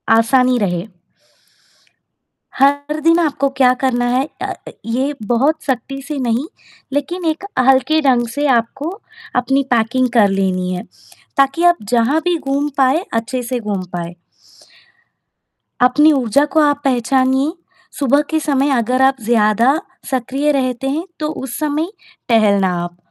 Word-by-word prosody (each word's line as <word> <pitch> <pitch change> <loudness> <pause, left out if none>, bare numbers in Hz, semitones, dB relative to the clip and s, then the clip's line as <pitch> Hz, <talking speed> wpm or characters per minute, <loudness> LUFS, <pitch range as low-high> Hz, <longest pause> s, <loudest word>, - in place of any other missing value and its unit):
आसानी 250 +2 +3
रहे। 180 -2 -2 1.7
हर 285 +3 +1
दिन 330 +1 +4
आपको 280 -4 0
क्या 255 -2 +5
करना 245 -2 +1
है 270 +3 +1
अ, - - -2 0.3
ये 260 +5 -1
बहुत 285 +7 +1
सख्ती 275 +1 -3
से 285 +1 -6
नहीं 245 +3 -1 0.5
लेकिन 340 +5 -3
एक 325 +5 -8 0.2
हल्के 270 +4 +3
ढंग 245 -4 +2
से 295 - 0
आपको 270 +7 -5 0.5
अपनी 270 +2 +1
पैकिंग 240 +2 +2
कर 220 -4 +5
लेनी 185 -2 -1
है। 180 - -4 0.5
ताकि 275 +5 +2
आप 350 0 +5
जहाँ 245 +6 +2
भी 355 -1 +2
घूम 280 0 -2
पाए, 270 +6 +3
अच्छे 245 +2 -2
से 245 +1 -3
घूम 205 -4 -3
पाए। 170 0 -5 1.7
अपनी 295 +5 +5
ऊर्जा 275 +1 +2
को 315 - +4
आप 290 -1 +2
पहचानिए। 265 +2 +1 0.5
सुबह 280 +1 +3
के 315 -1 +1
समय 285 -2 0
अगर 250 +3 0
आप 265 0 +4
ज़्यादा 235 +5 +3 0.3
सक्रिय 270 +4 0
रहते 260 -1 -1
हैं, 320 +6 -2
तो 305 - -1
उस 265 -5 -5
समय 305 +2 -1 0.4
टहलना 200 -4 +3
आप। 175 0 -8
265 Hz, 140 wpm, -17 LUFS, 235-290 Hz, 1.7 s, क्या